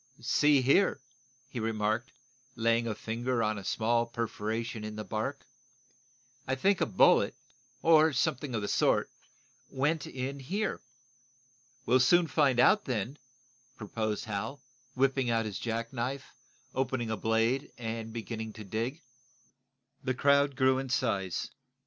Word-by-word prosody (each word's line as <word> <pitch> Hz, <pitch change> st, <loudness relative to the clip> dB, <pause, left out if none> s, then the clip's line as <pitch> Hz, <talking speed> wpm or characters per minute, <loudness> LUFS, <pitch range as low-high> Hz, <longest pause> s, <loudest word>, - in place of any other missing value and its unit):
"See 145 Hz, -3 st, +3 dB
here," 145 Hz, +6 st, +3 dB, 0.5 s
he 130 Hz, -2 st, -6 dB
remarked, 110 Hz, +2 st, -1 dB, 0.4 s
laying 115 Hz, 0 st, +2 dB
a 110 Hz, -, -2 dB
finger 115 Hz, +2 st, -2 dB
on 110 Hz, -1 st, 0 dB
a -, -, -10 dB
small 115 Hz, +4 st, +1 dB
perforation 115 Hz, -1 st, -3 dB
in 105 Hz, 0 st, -6 dB
the 105 Hz, -, -5 dB
bark, 110 Hz, +7 st, -4 dB, 1.0 s
"I 130 Hz, -, +1 dB
think 190 Hz, +8 st, +2 dB
a -, -, +2 dB
bullet, -, -, +4 dB, 0.5 s
or 160 Hz, -1 st, +6 dB
something 130 Hz, 0 st, -1 dB
of 110 Hz, -, -2 dB
the -, -, -2 dB
sort, -, -, +2 dB, 0.6 s
went 145 Hz, +3 st, 0 dB
in 135 Hz, +2 st, -4 dB
here." 195 Hz, +11 st, -2 dB, 1.0 s
"We'll 130 Hz, +2 st, +4 dB
soon 170 Hz, +7 st, +5 dB
find 140 Hz, -5 st, +2 dB
out 210 Hz, +11 st, +5 dB
then," 125 Hz, +2 st, -3 dB, 0.6 s
proposed 110 Hz, +1 st, -3 dB
Hal, 110 Hz, +6 st, -4 dB, 0.3 s
whipping 135 Hz, -1 st, +2 dB
out 115 Hz, -1 st, +1 dB
his 105 Hz, -3 st, -4 dB
jack 115 Hz, +1 st, -3 dB
knife, 130 Hz, +3 st, -4 dB, 0.4 s
opening 130 Hz, -3 st, -1 dB
a -, -, 0 dB
blade 115 Hz, +5 st, 0 dB
and 115 Hz, -1 st, -5 dB
beginning 110 Hz, -1 st, -5 dB
to 110 Hz, -, -9 dB
dig. 115 Hz, -, -3 dB, 1.0 s
The 130 Hz, -1 st, -1 dB
crowd 140 Hz, +1 st, +3 dB
grew 130 Hz, 0 st, +3 dB
in 135 Hz, -1 st, -5 dB
size. 100 Hz, -8 st, -1 dB
120 Hz, 135 wpm, -30 LUFS, 110-135 Hz, 1.0 s, or